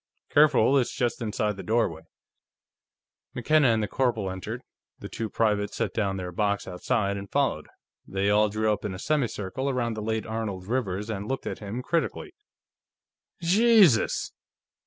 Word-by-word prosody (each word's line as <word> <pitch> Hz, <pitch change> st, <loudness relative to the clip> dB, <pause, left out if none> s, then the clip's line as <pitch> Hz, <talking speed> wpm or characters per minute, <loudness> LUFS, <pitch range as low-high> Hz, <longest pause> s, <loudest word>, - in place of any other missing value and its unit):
"Careful; 140 Hz, -3 st, +5 dB
it's 125 Hz, -, -2 dB
just 120 Hz, -1 st, -1 dB
inside 105 Hz, -2 st, -1 dB
the -, -, -5 dB
doorway." 110 Hz, -8 st, 0 dB, 1.3 s
McKenna 155 Hz, -3 st, +3 dB
and 110 Hz, -2 st, +2 dB
the -, -, -1 dB
corporal 115 Hz, -7 st, 0 dB
entered; 95 Hz, -1 st, -6 dB, 0.3 s
the -, -, -8 dB
two 110 Hz, -1 st, -4 dB
privates 105 Hz, -1 st, 0 dB
set -, -, -2 dB
down 100 Hz, -3 st, -1 dB
their 90 Hz, -1 st, -5 dB
box 100 Hz, +2 st, -1 dB
outside 100 Hz, +2 st, -1 dB
and 100 Hz, 0 st, -7 dB
followed. -, -, 0 dB, 0.4 s
They 95 Hz, +1 st, -1 dB
all 105 Hz, +1 st, +4 dB
drew 110 Hz, +1 st, +1 dB
up 105 Hz, -, -5 dB
in 100 Hz, -3 st, -3 dB
a -, -, -6 dB
semicircle 130 Hz, -1 st, -1 dB
around 120 Hz, -3 st, -1 dB
the 110 Hz, -, -5 dB
late 110 Hz, +1 st, -2 dB
Arnold 110 Hz, -4 st, -4 dB
Rivers 105 Hz, -3 st, -2 dB
and 100 Hz, -1 st, -4 dB
looked 135 Hz, +2 st, -3 dB
at -, -, -4 dB
him 110 Hz, +4 st, -5 dB
critically. 170 Hz, -, -2 dB, 1.1 s
"Jesus!" 195 Hz, -, +4 dB
110 Hz, 155 wpm, -26 LUFS, 100-125 Hz, 1.3 s, Careful